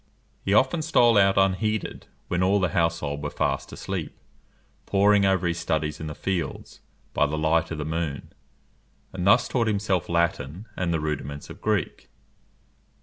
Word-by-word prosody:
He 95 - -1
often 130 +8 +3
stole 120 -7 +4
out 95 0 +4
unheeded, 100 +2 0 0.2
when 90 0 -1
all 95 +2 +3
the 90 -2 +1
household 80 -4 -1
were 75 - -3
fast - - -2
asleep, - - -5 0.7
poring 100 0 +4
over 95 -2 +1
his 85 -1 -1
studies 80 -2 -1
in 80 - -5
the 75 - -6
fields, 95 -3 -4 0.3
by 75 - +2
the 75 +2 -3
light 80 +2 +1
of 85 - -4
the 75 - -4
moon; 80 -3 -4 0.8
and 95 0 -2
thus 120 +5 +5
taught 120 -3 0
himself 100 -4 0
Latin 85 +1 -1
and 90 -2 -1
the 80 - +1
rudiments 75 -2 -4
of - - -12
Greek. - - -2
85 Hz, 160 wpm, -25 LUFS, 80-100 Hz, 0.8 s, thus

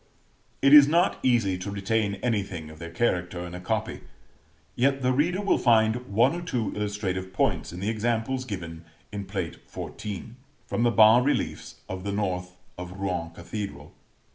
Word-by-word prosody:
It 140 +1 +6
is 145 -2 +10
not 170 +4 +2
easy 115 -8 +2
to 95 +2 -5
retain 100 +1 0
anything 95 -9 -2
of 80 - -13
their 85 0 -7
character 90 -2 -1
in 90 - -8
a 90 - -6
copy; 110 +3 -2 0.7
yet 135 +2 +1
the 125 - +3
reader 170 +8 +1
will 200 - +2
find 115 +1 +3
one 115 +8 +3
or 175 - -4
two 125 - -2
illustrative 100 -3 -3
points 95 - 0
in 90 +2 -7
the 100 - -1
examples, 115 +3 -1
given 85 -8 -6 0.3
in 100 -1 -5
Plate 90 -4 -4
XIV., 105 +1 -6 0.3
from - - -2
the 120 - +4
bas 110 +1 +6
reliefs 145 - -2
of 95 0 -6
the 100 - -2
north 90 -3 -2 0.2
of 90 0 -7
Rouen 90 -3 -3
Cathedral. 85 -3 -7
105 Hz, 165 wpm, -26 LUFS, 90-120 Hz, 0.7 s, is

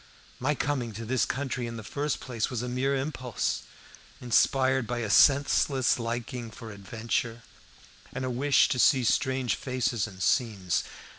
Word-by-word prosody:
My 145 +4 0
coming 130 -6 -2
to 115 +3 -6
this 125 -1 +1
country 130 -3 -3
in 115 0 -6
the 110 - -7
first 145 +6 -2
place 115 -4 -3
was 125 -2 -3
a - - -3
mere 130 +3 0
impulse, 130 -4 -2 0.6
inspired 130 +1 +2
by 120 - -2
a 110 -3 -2
senseless 135 +1 +4
liking 120 0 -4
for 110 +1 -10
adventure 115 +2 -3 0.7
and 130 - -4
a 130 - -2
wish 135 +3 +3
to 125 - -1
see 130 +1 +5
strange 130 -1 +1
faces 125 -3 -1
and 95 -3 -12
scenes. 100 -4 +1
125 Hz, 155 wpm, -28 LUFS, 115-130 Hz, 0.7 s, see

